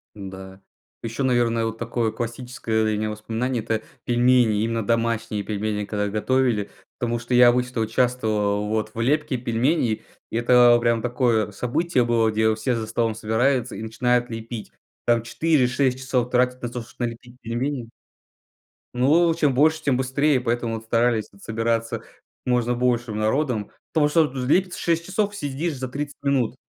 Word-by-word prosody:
Да. 95 -1 -9 0.4
Ещё, 115 +4 -3
наверное, 120 -2 +2
вот 115 0 -3
такое 115 -1 -1
классическое 115 -1 -3
для 110 -1 +1
меня 110 0 -1
воспоминание- 115 +3 -2
это 110 -1 -1 0.2
пельмени, 120 -3 +3
именно 115 -1 -1
домашние 115 -2 0
пельмени, 105 0 -2
когда 105 0 -2
готовили. 110 0 0 0.3
Потому 120 -1 -1
что 120 +2 -7
я 125 0 +7
обычно 125 -1 +1
участвовал, 110 -3 0
вот, 110 0 -1
в 115 - -4
лепке 135 0 +1
пельменей. 120 0 0 0.3
И - - -3
это 120 0 +6
прям 115 -1 +2
такое 120 -3 +1
событие 130 - 0
было, 115 -2 +2
где 110 0 +2
все 110 +3 -1
за 110 -1 -3
столом 115 0 0
собираются 120 +3 0
и - - -6
начинают 120 +2 0
лепить. 115 0 -7 0.3
Там 120 -1 +3
4-6 130 -1 +1
часов 125 -2 -1
тратят 125 0 +1
на 120 - -2
то, 120 0 -5
что 115 +2 -10
налепить 120 +1 -7
пельмени. 120 +1 -3 1.0
Ну, 155 +7 +4
э, - - +1
чем 150 -5 +2
больше, 155 +4 +3
тем 140 -4 +2
быстрее, 130 +2 +1
поэтому 120 -1 -1
вот 110 0 -6
старались 115 -1 +1
вот 100 - -19
собираться 115 +1 -1 0.4
можно 125 -1 +1
большим 120 -3 0
народом. 110 -1 0 0.2
Потому 150 -2 +3
что 165 +2 +4
вот, 135 - -11
э, 125 - -2
лепится 180 +6 +2
6 170 0 0
часов- 205 +1 -1
съешь 150 -1 -3
за 130 0 -4
30 145 +1 -5
минут. 130 -4 +1
120 Hz, 165 wpm, -23 LUFS, 110-130 Hz, 1.0 s, я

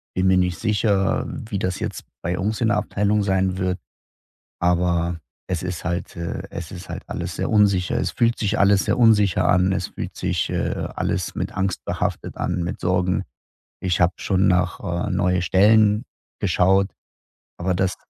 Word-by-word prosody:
bin 95 +1 +2
mir 95 0 +5
nicht 90 -2 +1
sicher, 105 -3 +1
wie 105 -3 -5
das 95 0 -2
jetzt - - -4 0.2
bei 90 +2 -2
uns 105 +4 -1
in 110 - +3
der 105 - +2
Abteilung 105 0 +1
sein 95 -1 +1
wird, 95 -1 -1 0.8
aber 85 -1 +1 0.3
es 90 -3 -1
ist 90 -1 -4
halt, 90 0 -3
äh 85 0 -4
es 80 -2 -7
ist 90 -1 -9
halt - - -6
alles - - -4
sehr - - -1
unsicher. 100 -4 +3
Es - - 0
fühlt 115 0 +1
sich 105 0 0
alles 100 0 +4
sehr - - 0
unsicher 105 -6 +4
an. 95 0 +3
Es 95 - -1
fühlt - - -7
sich, - - -1
äh, - - -2
alles - - -2
mit - - -3
Angst 95 -1 -2
behaftet - - -3
an, 85 - -1
mit 85 - -4
Sorgen. 90 0 +1 0.6
Ich 90 -1 0
habe 90 0 +4
schon 95 0 +1
nach, 90 -1 +1
äh, 90 +1 -2
neue 90 -1 +1
Stellen 105 +3 +4 0.4
geschaut, 95 +2 +3 0.7
aber 90 +1 -1
das 95 0 0
95 Hz, 175 wpm, -22 LUFS, 90-100 Hz, 0.8 s, mir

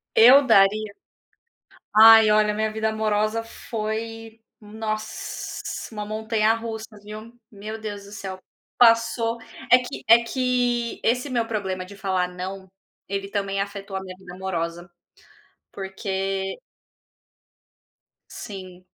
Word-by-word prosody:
Eu 260 +5 +8
daria 215 -2 +4 1.0
ai, 220 0 +9
olha, 210 0 +4
a - - -5
minha 215 0 0
vida 220 0 -1
amorosa 215 +1 0
foi, 225 0 -5 0.2
nossa, 215 0 -5 0.3
uma 210 -1 -5
montanha 220 +1 +1
russa, 225 -1 -5 0.2
viu, 215 +3 -10
meu 215 +1 -7
Deus 205 -2 -6
do 200 - -13
céu. 190 -3 -6 0.4
Passou 230 0 +4 0.3
é 250 - +9
que 250 +2 -7
é 230 +1 +8
que 245 -1 0
esse 250 +4 +1
meu 235 -2 +1
problema 190 -4 -3
de 200 +2 -12
falar 190 -2 0
"não", 190 +2 -7 0.4
ele 195 0 -3
também 195 -1 -2
afetou 200 -1 -4
a - - -4
minha 185 -1 -9
vida 180 -1 -12
amorosa, 175 -2 -4 0.8
porque 195 0 -3 1.7
Sim, 185 -4 -9
215 Hz, 120 wpm, -24 LUFS, 195-225 Hz, 1.7 s, ai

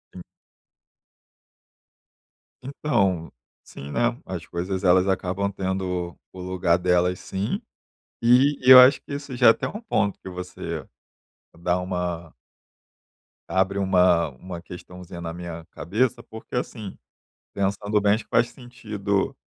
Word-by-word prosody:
Hum. 90 - -8 2.4
Então, 100 - 0 0.3
sim, 70 +1 -10
né, 120 +4 +1
as 90 -3 -6
coisas 95 +2 -3
elas 90 +1 +5
acabam 95 +1 -1
tendo 95 -2 -3
o 95 - -12
lugar 90 -2 +1
delas 90 0 +1
sim. 95 +2 -3 0.6
E 130 +5 +5
e 130 - +4
eu 130 - +12
acho 130 +1 +6
que - - -10
isso 140 -3 -6
já 120 - +4
é - - +11
até - - 0 0.2
ponto 100 - +1
que - - -9
você, 90 0 -6 0.7
dá 90 +1 0
uma 90 -2 -4 1.2
abre 95 +2 +1
uma, 90 -4 +3
uma 85 +6 -9
questãozinha 90 -1 -10
na 85 -1 -5
minha 85 -1 -7
cabeça, 110 +6 -1
porque 110 +2 -10
assim, 110 -5 -4 0.6
pensando 100 +1 0
bem 100 0 +4
acho 110 - -4
que - - -39
faz 120 0 +3
sentido, 105 -6 -3
95 Hz, 130 wpm, -24 LUFS, 90-110 Hz, 2.4 s, eu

